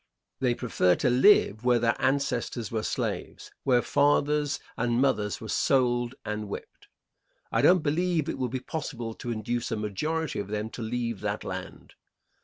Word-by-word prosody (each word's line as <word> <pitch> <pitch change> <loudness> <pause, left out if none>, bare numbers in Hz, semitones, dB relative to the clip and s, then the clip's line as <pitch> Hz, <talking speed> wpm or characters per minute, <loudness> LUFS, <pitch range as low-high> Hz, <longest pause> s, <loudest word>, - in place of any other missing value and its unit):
They 125 -2 +1
prefer 115 -7 +2
to 125 - +1
live 125 - +5
where 125 -1 +4
their 115 0 +2
ancestors 125 -4 0
were 110 -1 -1
slaves, - - -4
where 125 -3 +3
fathers 145 +2 +2 0.2
and 120 0 0
mothers 105 -7 +1
were 110 - -8
sold 120 0 +1
and 105 0 -3
whipped; - - -8 0.6
and - - +1
I - - +4
don't 180 -3 +5
believe 160 +1 +1
it - - -3
will 125 - -1
be 130 +2 -3
possible 125 -6 -5
to 120 - -7
induce 120 +2 -2
a 115 - -1
majority 150 +10 -2
of 100 - -4
them 105 +1 -3
to - - -7
leave 115 -1 -2
that - - -3
land. - - -7
120 Hz, 170 wpm, -27 LUFS, 110-140 Hz, 0.6 s, live